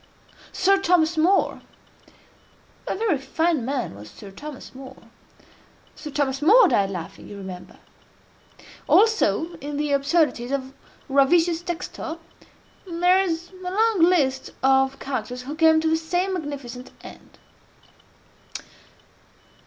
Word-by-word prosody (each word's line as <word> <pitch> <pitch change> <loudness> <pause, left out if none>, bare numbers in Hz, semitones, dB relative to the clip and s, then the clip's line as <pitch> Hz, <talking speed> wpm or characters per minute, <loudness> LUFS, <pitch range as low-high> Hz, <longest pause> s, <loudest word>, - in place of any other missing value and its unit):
Sir 390 +1 +3
Thomas 345 -3 +2
More—a 350 +5 +2 1.3
very 390 -8 0
fine 320 0 0
man 260 - -3
was 105 +2 -12
Sir 200 - -12
Thomas 290 +7 -10
More—Sir 260 +3 -15
Thomas 275 -2 -1
More 425 +11 +7
died 195 -1 +2
laughing, 175 -4 -8
you 205 - -9
remember. 190 -2 -9 1.1
Also 420 -6 +3
in 290 +1 -6
the 295 0 -1
Absurdities 280 -3 +1
of 270 -1 -3 0.3
Ravisius 325 +5 +3
Textor, 340 -1 -5 0.7
there 355 +2 +3
is 345 -2 -3
a 370 -1 -7
long 440 0 +2
list 310 -7 +2
of 265 0 +3
characters 250 -1 -5
who 280 +4 -6
came 320 0 +4
to 320 0 0
the 320 - +3
same 355 +4 -1
magnificent 280 -7 -6
end. - - -14
300 Hz, 115 wpm, -23 LUFS, 265-350 Hz, 1.3 s, More